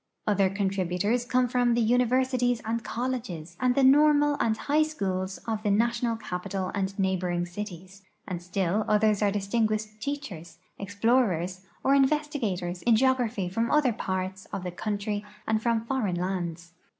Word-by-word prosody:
Other 200 Hz, -2 st, +3 dB
contributors 195 Hz, +3 st, 0 dB
come 250 Hz, 0 st, +2 dB
from 245 Hz, -1 st, +2 dB
the 240 Hz, -, +2 dB
universities 245 Hz, +1 st, +2 dB
and 230 Hz, +1 st, -2 dB
col 245 Hz, +2 st, -2 dB
leges 175 Hz, -10 st, -5 dB
and 250 Hz, -1 st, +2 dB
the 275 Hz, -, +3 dB
normal 295 Hz, +2 st, +5 dB
and 220 Hz, -1 st, +1 dB
high 295 Hz, +6 st, +1 dB
schools 190 Hz, -11 st, -2 dB
of 220 Hz, -2 st, -1 dB
the 210 Hz, -, 0 dB
national 235 Hz, +2 st, +1 dB
caj)ital 185 Hz, -2 st, -4 dB
and 195 Hz, -1 st, -2 dB
neighboring 185 Hz, -2 st, 0 dB
cities; 185 Hz, +1 st, -8 dB, 0.3 s
and 180 Hz, -3 st, -4 dB
still 185 Hz, +3 st, 0 dB
others 210 Hz, -1 st, +3 dB
are 205 Hz, -, +3 dB
distinguished 215 Hz, +1 st, -1 dB
teachers, 195 Hz, -, -5 dB, 0.2 s
explorers, 200 Hz, -3 st, 0 dB, 0.2 s
or 270 Hz, -, +4 dB
investigators 265 Hz, -, 0 dB
in 235 Hz, -2 st, +4 dB
geography 245 Hz, -5 st, +1 dB
from 225 Hz, +6 st, -1 dB
other 290 Hz, -5 st, +3 dB
parts 190 Hz, -1 st, -3 dB
of 185 Hz, -, -6 dB
the 180 Hz, -, -4 dB
country 205 Hz, +2 st, -3 dB, 0.2 s
and 220 Hz, 0 st, +1 dB
from 230 Hz, -1 st, 0 dB
foreign 230 Hz, -8 st, -1 dB
lands. 175 Hz, -2 st, -3 dB
215 Hz, 150 wpm, -27 LUFS, 185-245 Hz, 0.3 s, normal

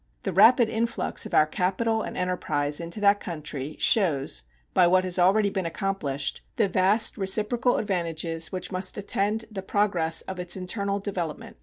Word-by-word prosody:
The 195 Hz, -, -3 dB
rapid 225 Hz, +5 st, +6 dB
influx 230 Hz, +1 st, -1 dB
of -, -, -14 dB
our 155 Hz, -, +6 dB
capital 195 Hz, +8 st, -1 dB
and -, -, -6 dB
enterprise 150 Hz, -5 st, -1 dB
into 170 Hz, +4 st, -5 dB
that 205 Hz, 0 st, +4 dB
country 150 Hz, -4 st, -6 dB
shows, 145 Hz, -, +2 dB, 0.3 s
by 180 Hz, -, +5 dB
what 185 Hz, +1 st, +3 dB
has 180 Hz, 0 st, -1 dB
already 200 Hz, +3 st, +3 dB
been 190 Hz, -3 st, -2 dB
accomplished, 165 Hz, -6 st, -2 dB
the 220 Hz, -5 st, +2 dB
vast 195 Hz, +5 st, +2 dB
reciprocal 215 Hz, +5 st, +1 dB
advantages 165 Hz, -4 st, -2 dB
which 185 Hz, 0 st, -5 dB
must 185 Hz, +2 st, -1 dB
attend 205 Hz, +2 st, -1 dB
the 195 Hz, -3 st, -5 dB
progress 185 Hz, -5 st, 0 dB
of 190 Hz, -1 st, -7 dB
its 180 Hz, +1 st, 0 dB
internal 200 Hz, +2 st, -2 dB
development. 180 Hz, -, -5 dB
185 Hz, 160 wpm, -26 LUFS, 170-205 Hz, 0.3 s, rapid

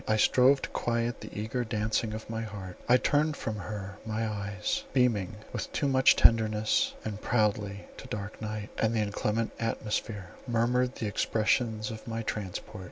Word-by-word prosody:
I 110 Hz, -, +3 dB
strove 130 Hz, +5 st, +5 dB
to -, -, -3 dB
quiet 120 Hz, 0 st, -1 dB
the -, -, -7 dB
eager 110 Hz, +4 st, -2 dB
dancing 110 Hz, 0 st, -1 dB
of 110 Hz, -, -7 dB
my 110 Hz, 0 st, -3 dB
heart; 100 Hz, -5 st, -6 dB
I 125 Hz, -, +8 dB
turned 150 Hz, +3 st, +2 dB
from 110 Hz, -1 st, -3 dB
her 100 Hz, 0 st, -6 dB
my 110 Hz, 0 st, -1 dB
eyes, 105 Hz, 0 st, -2 dB
beaming 115 Hz, -6 st, +2 dB, 0.2 s
with -, -, -4 dB
too 145 Hz, -, +1 dB
much 130 Hz, -1 st, +5 dB
tenderness, 110 Hz, -1 st, +4 dB
and 105 Hz, -1 st, -4 dB
proudly, 105 Hz, -3 st, 0 dB
to -, -, -9 dB
dark 105 Hz, +1 st, -6 dB
night, 105 Hz, -1 st, -4 dB
and 110 Hz, +1 st, +2 dB
the -, -, +2 dB
inclement 105 Hz, +2 st, 0 dB
atmosphere, 105 Hz, -3 st, -2 dB, 0.2 s
murmured 125 Hz, +2 st, +2 dB
the 115 Hz, -, -4 dB
expressions 110 Hz, +1 st, +1 dB
of 110 Hz, +1 st, -9 dB
my 115 Hz, 0 st, -3 dB
transport. 105 Hz, -1 st, -5 dB
110 Hz, 165 wpm, -29 LUFS, 105-115 Hz, 0.2 s, I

